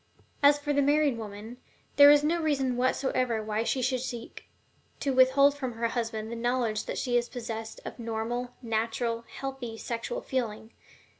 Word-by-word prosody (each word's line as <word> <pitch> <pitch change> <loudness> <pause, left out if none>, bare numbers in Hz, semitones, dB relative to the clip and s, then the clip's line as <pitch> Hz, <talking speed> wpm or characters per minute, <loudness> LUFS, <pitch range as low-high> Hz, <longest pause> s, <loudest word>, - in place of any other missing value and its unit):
As 285 0 +6
for 290 0 -2
the 285 - +3
married 290 -1 +3
woman, 220 +1 -8 0.4
there 285 0 +9
is 290 0 +6
no 335 +3 +1
reason 275 -5 0
whatsoever 255 -2 0
why 215 +1 -1
she 255 +2 -1
should 255 0 +1
seek 240 -2 -7 0.5
to 275 -2 0
withhold 265 +2 +5
from 260 -4 -4
her 230 0 -1
husband 225 -2 -3
the - - -4
knowledge 235 -2 -1
that - - -4
she 245 -2 +1
is 240 0 -1
possessed 225 -2 -6
of - - -7
normal, 230 +2 -3
natural, 230 +1 -1
healthy 265 -4 -6
sexual 235 - -4
feeling. 230 - -3
245 Hz, 165 wpm, -28 LUFS, 230-270 Hz, 0.5 s, there